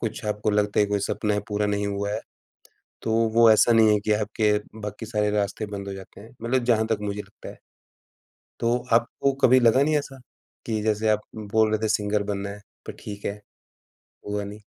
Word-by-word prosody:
कुछ 110 -1 -4
आपको 105 +1 -1
लगता 105 0 +1
है 105 - +4
कोई 105 0 0
सपना 105 -1 -1
पूरा 105 0 0
नहीं 105 0 -1
हुआ 100 0 -2
है, 110 - -2 0.8
तो 110 - -1 0.2
वो 115 -1 +7
ऐसा 110 +2 +5
नहीं 110 -2 +5
है 105 - +3
कि 110 - +2
आपके 105 0 +1 0.3
बाकी 105 +2 -6
सारे 105 -2 0
रास्ते 105 +1 -1
बंद 100 -1 -6
हो - - -4
जाते 95 +1 -11
हैं। 110 +2 -13
मतलब 120 +2 0
जहाँ 110 -2 +2
तक 110 -2 0
मुझे 105 0 -3
लगता - - -13
है। - - -11 1.0
तो 120 +1 +2 0.2
आपको 120 +4 +2
कभी 130 0 +6
लगा 120 +3 +5
नहीं 155 +2 +2
ऐसा, 135 -2 -8 0.5
कि 110 -2 -1
जैसे 110 0 +1
आप 105 - +2 0.3
बोल 110 -1 +4
रहे 110 - +1
थे - - +1
सिंगर 105 0 +1
बनना 100 0 -4
है, 105 +1 -9 0.3
पर - - -5
ठीक 100 -1 -7
है, 105 +1 -4 0.9
हुआ 105 0 -2
नहीं। 105 +1 -9
105 Hz, 205 wpm, -25 LUFS, 105-115 Hz, 1.0 s, वो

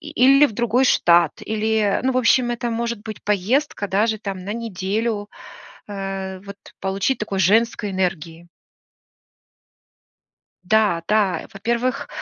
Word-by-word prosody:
И 310 - -9
или 275 +1 +6
в 225 - -8
другой 240 +3 +1
штат, 170 -7 +4
или, 220 0 -1 0.2
э, - - -7
ну, 260 0 +1
в - - -2
общем, 245 0 +3
это 240 0 -3
может 230 -1 -3
быть 220 -1 -8
поездка 210 +3 0
даже 215 +3 +1
там 195 -3 -5
на 190 +3 -5
неделю, 215 0 -3 0.6
э, 195 -1 -5
вот 200 0 -10 0.2
получить 195 +7 -1
такой 200 -2 -3
женской 210 +2 +2
энергии. 170 -2 -3 2.2
Да, 205 -4 +2
да, 210 -4 +2
э, - - -12
во-первых, 235 +5 -2
210 Hz, 140 wpm, -21 LUFS, 195-235 Hz, 2.2 s, или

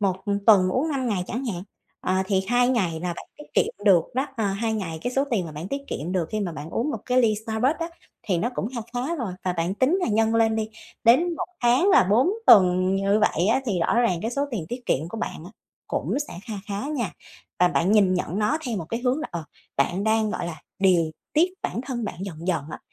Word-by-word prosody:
1, 190 -1 -1
ừm, 200 -1 0
tuần 190 -4 +7
uống 260 +11 0
5 260 -4 -1
ngày 185 -4 -1
chẳng 250 +4 -4
hạn, 185 -8 -3 0.4
ờ, 185 - 0
thì 190 -1 +2
2 245 0 +3
ngày 180 -10 0
là 175 0 -2
bạn - - -8
tiết 295 - -10
kiệm 205 - 0
được 180 -5 +6
đó. 265 +2 0
Ờ, 225 - 0
2 220 +3 -1
ngày 170 -7 -3
cái 245 - -2
số 275 +2 +2
tiền 205 -6 +1
mà 155 - -8
bạn 160 +5 -6
tiết 280 0 -3
kiệm 165 +6 -4
được 175 -4 0
khi 215 - -1
mà 180 -4 -2
bạn 155 +1 -7
uống 270 - -1
một - - -3
cái 250 0 +3
ly 215 -2 +3
Starbucks 245 +9 0
đó 330 - -2 0.3
thì 185 -5 0
nó 235 +8 0
cũng 210 - -2
kha 235 - -2
khá 260 +8 -1
rồi 235 - -3
và 180 - +1
bạn 175 +2 -1
tính 265 - +2
là 355 - 0
nhân 225 +1 +2
lên 225 -1 +3
đi, 220 0 -1 0.4
đến 330 +9 +5
1 - - -3 0.2
tháng 250 +10 +4
là - - +6
4 225 - +3 0.2
tuần 185 -1 +6
như 200 +2 +2
vậy 180 -3 +2
á 230 +5 +3
thì 185 -6 0
rõ - - +1
ràng 185 -8 +2
cái 225 - -1
số 280 +3 0
tiền 195 -10 -3
tiết 245 0 -6
kiệm 155 +5 0
của 225 - -6
bạn 165 - -5
á 180 - -10 0.4
cũng - - -1
sẽ - - -8
kha 220 - -6
khá 205 +6 -3
nha. 250 - -2 0.5
Và 180 0 +5
bạn 180 +3 +1
nhìn 195 -4 +4
nhận 180 +1 -2
nó 265 +9 +1
theo 235 - -2
một 170 - -3
cái 230 +4 -3
hướng 255 +4 +1
là, 315 - -4
ờ, 170 -2 -5 0.3
bạn 175 +9 +1
đang, 220 -1 +2
gọi 175 - -3
là, 160 -3 -7 0.2
điều 175 -5 +3 0.2
tiết 345 +4 +3
bản 235 - -2
thân 240 -4 -3
bạn 205 - -4
dần 170 -2 -7
dần 160 -6 0
á, - - -6
210 Hz, 260 wpm, -24 LUFS, 180-245 Hz, 0.5 s, tuần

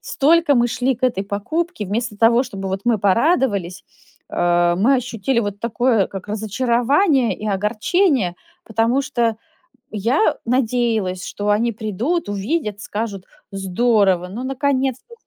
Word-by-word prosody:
столько 330 - +3
мы 240 0 +3
шли 255 +3 0
к 250 - -31
этой 240 -7 +1
покупке, 310 - -3
вместо 215 +2 -3
того, 230 +3 +4
чтобы 195 -6 -6
вот 190 +1 -3
мы 240 -2 +3
порадовались, 205 - +1 0.5
а, 175 0 +2
мы 230 +9 +3
ощутили 245 -1 -1
вот 205 -2 -4
такое 235 -2 +1
как 195 +1 -9
разочарование 240 - +1
и 215 - -6
огорчение, 215 - +1 0.3
потому 230 +4 +1
что 235 -5 0 0.6
я 230 - +1
надеялась, 230 -6 0
что 205 0 -4
они 230 +3 +2
придут, 220 - -2
увидят, 205 +1 -2
скажут: 205 -3 -5 0.3
"Здорово! 195 -1 +1
Ну 225 +7 -6
наконец-то! 270 - -1
230 Hz, 130 wpm, -20 LUFS, 200-260 Hz, 0.6 s, того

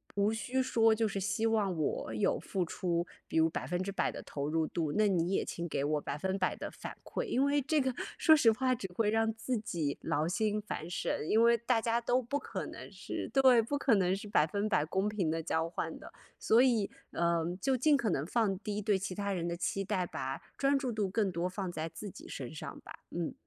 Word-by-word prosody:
无 205 +1 +2
需 250 +4 -1
说 225 -3 +4
就 220 0 +1
是， 195 -1 -3
希 200 +3 0
望 210 -5 +2
我 150 -6 -1
有 105 - +1
付 185 -3 -2
出， 170 0 -1 0.2
比 - - -2
如 160 0 +5
100% 180 +8 -2
的 - - -7
投 145 0 -4
入 160 0 +1
度， 160 -3 -2
那 215 0 +3
你 180 -1 +1
也 - - +1
请 170 0 -4
给 140 - -1
我 150 0 0
100% 185 +7 -1
的 - - -5
反 - - -8
馈。 - - -3
因 275 - +2
为 285 0 +2
这 305 +3 +1
个 260 -2 +1 0.2
说 315 -2 +7
实 240 -6 +5
话 255 +3 +1
只 200 -5 -5
会 215 -2 +2
让 225 0 +2
自 245 +3 -2
己 165 -9 -2
劳 150 +2 0
心 210 +3 0
烦 175 -5 -5
神， 160 -3 -2
因 225 +2 +5
为 235 0 +6
大 235 +1 +1
家 230 +1 +1
都 245 +2 +2
不 265 +4 -2
可 - - -5
能 - - -9
是 - - -5
对， 260 -3 +6
不 285 +6 -2
可 270 -4 +3
能 185 -1 +2
是 200 +2 -7
100% 200 -1 +2
公 190 +6 0
平 200 -6 0
地 165 - -1
交 160 0 0
换 - - -4
的， - - -11 0.3
所 225 - +4
以， 235 -6 +3 0.2
嗯， 170 0 0
就 265 -1 +2
尽 290 +4 +4
可 235 -6 +1
能 145 -4 0
放 200 0 +1
低 210 0 -3
对 205 -1 +2
其 190 0 -4
他 200 0 -2
人 175 -2 -1
的 170 - -2
期 195 +3 -1
待， 185 -3 0
把 135 +1 -4 0.2
专 275 0 +3
注 265 -3 -2
度 215 -3 0
更 200 -1 +1
多 170 +1 -1
放 185 -1 -4
在 160 -1 -3
自 205 +5 -7
己 - - -12
身 130 -3 -6
上 155 - -7
吧， - - -12
嗯。 170 -1 -3
200 Hz, 235 characters per minute, -32 LUFS, 170-230 Hz, 0.3 s, 说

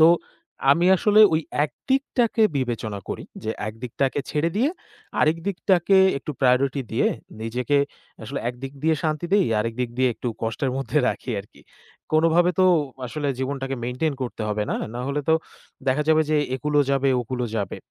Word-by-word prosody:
তো 160 - +9 0.7
আমি 170 +4 +2
আসলে 210 +4 +4
ওই 160 - +2 0.2
একদিকটাকে 240 - 0
বিবেচনা 115 -5 -2
করি - - -5 0.2
যে 110 - -1 0.2
একদিকটাকে 125 +5 -2
ছেড়ে 155 +3 0
দিয়ে 250 +7 +3 0.5
আরেক 155 +2 +3
দিকটাকে 190 -1 +2 0.2
একটু 140 - -6
প্রায়োরিটি 130 +2 +3
দিয়ে - - +2 0.3
নিজেকে 125 +5 0 0.4
আসলে - - -4
একদিক 130 +2 -6
দিয়ে 160 +1 +3
শান্তি 155 +1 -1
দেই, 200 -2 +4
আরেক 115 +2 -1
দিক 125 -2 -1
দিয়ে 130 0 +4
একটু 125 - -4
কষ্টের 115 +4 -1
মধ্যে 135 +2 0
রাখি - - -4
আরকি। 100 - -18 0.5
কোনভাবে 165 +3 +4
তো 185 - +6 0.4
আসলে 145 +3 -3
জীবনটাকে 135 0 -3
মেইন্টেইন 125 +5 -1
করতে 120 -2 -4
হবে, 105 0 -1
না? - - 0 0.2
না 120 - -3
হলে 140 +1 -1
তো 160 - +6 0.5
দেখা 130 +3 +2
যাবে 160 0 +5
যে 155 - +3 0.2
একূল 150 +3 -3
ও - - +5
যাবে 135 0 +2
ওকূল 125 +1 -4
ও - - -2
যাবে। 100 -3 -2
140 Hz, 170 wpm, -24 LUFS, 125-160 Hz, 0.7 s, তো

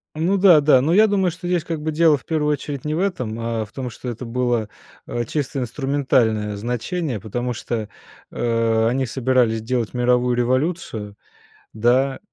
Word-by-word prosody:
Ну 175 +6 +1
да 180 -5 +7
да. 140 -3 +5
Ну 155 - +1
я 215 +5 +6
думаю, 190 -4 +1
что 175 +1 -7
здесь 175 -2 0
как 165 -2 -4
бы 155 - -2
дело 160 -2 +4
в - - -18
1 150 -2 0
очередь 140 -2 -5
не 150 0 -2
в 160 - -1
этом, 125 - -2
а 115 -1 -2
в 105 - -20
том, 130 -2 -5
что 125 +2 -7
это 120 +2 -6
было, 120 -2 0 0.4
а, 120 - -2
чисто 140 +2 -3
инструментальное 125 -5 0
значение, 125 - -3
потому 120 +4 -3
что, 110 -2 -4 0.4
э, 115 -1 +1
они 130 +2 0
собирались 125 -2 +1
делать 115 0 -2
мировую 125 0 +2
революцию, 125 - -1 0.6
да, 125 +5 +2
125 Hz, 175 wpm, -21 LUFS, 115-150 Hz, 0.6 s, да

